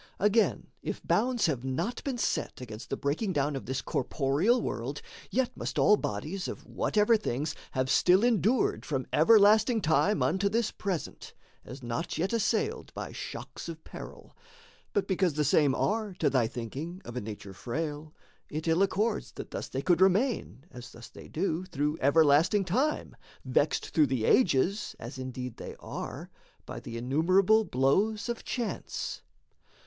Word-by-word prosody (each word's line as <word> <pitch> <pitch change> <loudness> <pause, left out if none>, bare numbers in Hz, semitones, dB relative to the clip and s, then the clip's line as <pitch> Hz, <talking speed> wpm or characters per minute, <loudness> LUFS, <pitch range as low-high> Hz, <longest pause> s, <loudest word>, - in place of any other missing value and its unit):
Again, 210 +2 +2 0.2
if - - -5
bounds 240 +2 +2
have 135 -7 -1
not 165 - -2
been 270 -3 -2
set - - -1
against 115 -3 -8
The - - -2
breaking 155 +8 -1
down 145 -1 0
of 135 - -6
this 130 +1 -2
corporeal 145 - +1
world, 135 - -3 0.3
Yet 255 0 0
must - - -4
all 210 - +6
bodies 155 - -4
of - - -7
whatever 215 +2 +2
things 150 - -2 0.2
Have 130 -1 0
still 185 +8 +4
endured 240 0 +2
from 135 -4 -2
everlasting 215 +6 +5
time 195 +4 +2
Unto 200 +1 +1
this 230 +1 0
present, 190 -6 -5 0.3
as 130 +1 -10
not 120 +8 -3
yet 185 +6 -1
assailed 230 - 0
By - - -5
shocks - - -7
of 160 -1 -8
peril. - - -11 0.6
But 205 - 0
because 185 -5 +1
the 150 - +1
same 145 -1 +3
Are, 215 -2 -1
to - - +2
thy 125 -4 +3
thinking, 140 - -6
of 120 - -8
a 125 - -2
nature 100 -2 -8
frail, 150 - -4 0.4
It 155 +2 -4
ill 165 +3 +3
accords 210 +3 0
that - - -8
thus - - -4
they 135 +1 -3
could 175 -1 +3
remain 195 - +2
(As 125 -1 -10
thus 115 - -12
they - - -12
do) 170 0 -1
through 150 -3 -2
everlasting 160 +7 +4
time, 260 - 0 0.3
Vexed - - +1
through 155 -4 +3
the 125 -4 -1
ages 195 - +2
(as 125 +4 -8
indeed 125 -2 -5
they - - -7
are) - - -7 0.3
By - - -6
the 115 - -7
innumerable 185 - +3
blows 200 - +1
of 235 - -3
chance. 240 -4 -4
165 Hz, 160 wpm, -29 LUFS, 135-210 Hz, 0.6 s, all